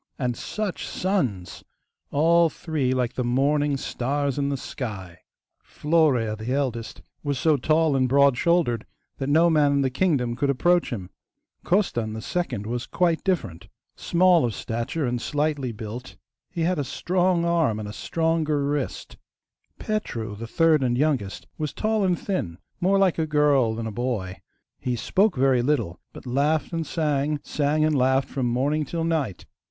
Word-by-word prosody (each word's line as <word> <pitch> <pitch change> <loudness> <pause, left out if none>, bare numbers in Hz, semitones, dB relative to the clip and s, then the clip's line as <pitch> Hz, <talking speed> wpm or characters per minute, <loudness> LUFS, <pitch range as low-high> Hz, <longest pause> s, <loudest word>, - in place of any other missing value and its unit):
And 125 -3 -1
such 210 - -4
sons! 130 - -2 0.5
All 165 +3 +4
three 150 -6 -2
like 125 -2 0
the 125 - -2
morning 140 +4 +1
stars 140 +2 -2
in 140 0 0
the 140 - -1
sky! 95 -10 -6 0.4
Florea, 145 -9 +1
the 110 +3 -5
eldest, 125 -5 -2 0.2
was 145 -2 -2
so 155 +3 +3
tall 155 +2 +2
and 130 -1 +2
broad 140 0 +5
shouldered 150 -8 +1 0.3
that 135 0 -2
no 160 +4 +5
man 150 -3 +3
in 140 - +2
the 130 -1 0
kingdom 130 -6 +1
could 140 +3 0
approach 175 +6 +2
him. 95 -7 -5 0.5
Costan, 120 - 0
the 110 - -5
second, 130 - -2
was 120 +2 -3
quite 170 -2 +1
different. 170 - -2 0.3
Small 180 -1 +3
of 115 -3 -1
stature, 120 +7 -3
and 120 -1 -2
slightly 145 -3 -1
built, 115 +3 -8 0.3
he 170 - -4
had 175 0 +1
a - - 0
strong 180 +4 0
arm 165 -11 +1
and 105 -1 -6
stronger 160 -2 0
wrist. 145 -2 -3 0.6
Petru, 115 - -3
the 115 +3 -7
third 160 +4 +3
and 120 -2 +1
youngest, 135 -9 -1
was 150 -2 -2
tall 215 -1 0
and 180 -2 +2
thin, 90 - -3 0.2
more 195 +3 +3
like 190 -4 +2
a 160 - 0
girl 145 -6 +3
than 115 0 -4
a 110 - -3
boy. 105 -5 -3 0.4
He 125 -1 -2
spoke 190 - +1
very 130 -1 +3
little, 120 - -1
but - - -12
laughed 145 +6 0
and 165 -1 -2
sang, 150 -2 0
sang 150 +1 +1
and 155 -1 +1
laughed, 130 0 +2
from 130 -3 -1
morning 140 +6 +1
till 165 +3 -3
night. 155 - -1
140 Hz, 165 wpm, -24 LUFS, 120-165 Hz, 0.6 s, broad